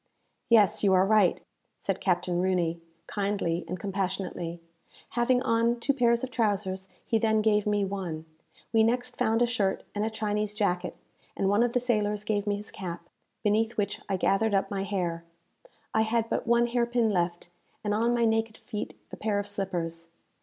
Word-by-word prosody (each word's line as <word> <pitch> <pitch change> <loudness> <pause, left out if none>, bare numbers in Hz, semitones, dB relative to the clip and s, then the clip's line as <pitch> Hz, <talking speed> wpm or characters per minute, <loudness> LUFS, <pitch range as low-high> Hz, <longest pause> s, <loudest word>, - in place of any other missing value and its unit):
"Yes, 215 -5 +5
you 195 -2 +5
are 185 0 +5
right," 210 -3 +4 0.4
said 195 -1 -2
Captain 180 -1 +1
Rooney, 175 -3 0 0.2
kindly 200 -4 -1
and 185 - -4
compassionately. 185 -3 -3 0.5
Having 245 +1 +2
on 230 0 +2
two 280 +4 +1
pairs 235 -3 +2
of 260 - -3
trousers, 200 -5 -1 0.2
he 225 - +1
then 220 -1 +2
gave 210 -1 +3
me 205 -1 +2
one. 180 -5 -4 0.5
We 225 - +5
next 245 +2 +1
found 225 -1 +2
a - - +5
shirt 215 -5 0
and 205 - -1
a 220 - 0
Chinese 210 -1 -2
jacket, 180 -4 0 0.4
and 195 - +1
one 205 +3 +3
of 240 0 +2
the 250 - +3
sailors 210 -4 0
gave 210 -1 -1
me 205 - +2
his 205 +1 -6
cap, 175 -2 -7 0.3
beneath 220 +2 +1
which 205 -1 -1
I 195 - +1
gathered 200 +3 +2
up 195 - 0
my 195 -1 -1
hair. 175 -4 -2 0.7
I 220 - +3
had 225 +1 0
but - - -1
one 235 0 +4
hair 240 0 +1
pin 235 -2 +2
left, 175 -2 -1 0.3
and 205 -1 0
on 230 +3 +2
my 235 -1 +3
naked 225 0 +1
feet 210 -3 -6
a - - -6
pair 210 -1 0
of 205 0 -2
slippers. 170 -5 -2
205 Hz, 180 wpm, -28 LUFS, 190-225 Hz, 0.7 s, Yes